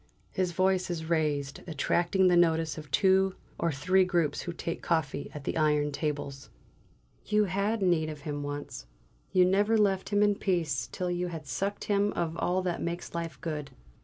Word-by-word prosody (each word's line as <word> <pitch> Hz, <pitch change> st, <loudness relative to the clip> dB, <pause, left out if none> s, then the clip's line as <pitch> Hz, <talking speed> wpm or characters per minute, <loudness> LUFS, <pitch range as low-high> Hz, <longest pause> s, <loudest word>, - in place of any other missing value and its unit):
His 185 Hz, -2 st, 0 dB
voice 185 Hz, +1 st, +1 dB
is 165 Hz, -2 st, -3 dB
raised, 145 Hz, -4 st, 0 dB
attracting 175 Hz, +4 st, +2 dB
the 180 Hz, -, +5 dB
notice 165 Hz, -2 st, +3 dB
of 150 Hz, -2 st, -9 dB
two 190 Hz, +5 st, +3 dB, 0.2 s
or 170 Hz, -, +1 dB
three 185 Hz, +7 st, +3 dB
groups 170 Hz, -5 st, 0 dB
who 175 Hz, -, -4 dB
take 170 Hz, 0 st, -5 dB
coffee 150 Hz, -4 st, -1 dB
at 145 Hz, -, -6 dB
the -, -, -2 dB
iron 150 Hz, -2 st, +2 dB
tables. 140 Hz, -2 st, -4 dB, 0.8 s
"You 210 Hz, 0 st, +3 dB
had 200 Hz, +3 st, 0 dB
need 165 Hz, -4 st, +2 dB
of 150 Hz, -2 st, -7 dB
him 145 Hz, -1 st, -4 dB
once. 145 Hz, -, -6 dB, 0.4 s
You 180 Hz, -1 st, +5 dB
never 205 Hz, +4 st, +3 dB
left 195 Hz, -3 st, +2 dB
him 205 Hz, 0 st, +3 dB
in 205 Hz, 0 st, +4 dB
peace 165 Hz, -, 0 dB
till 180 Hz, -1 st, -2 dB
you 175 Hz, 0 st, -1 dB
had 165 Hz, -3 st, -6 dB
sucked 195 Hz, +9 st, -3 dB
him 205 Hz, 0 st, +1 dB
of 165 Hz, -1 st, -2 dB
all 185 Hz, +2 st, 0 dB
that 175 Hz, -2 st, -2 dB
makes 170 Hz, +1 st, -4 dB
life 170 Hz, -1 st, -4 dB
good. 150 Hz, -4 st, -4 dB
170 Hz, 180 wpm, -29 LUFS, 150-190 Hz, 0.8 s, the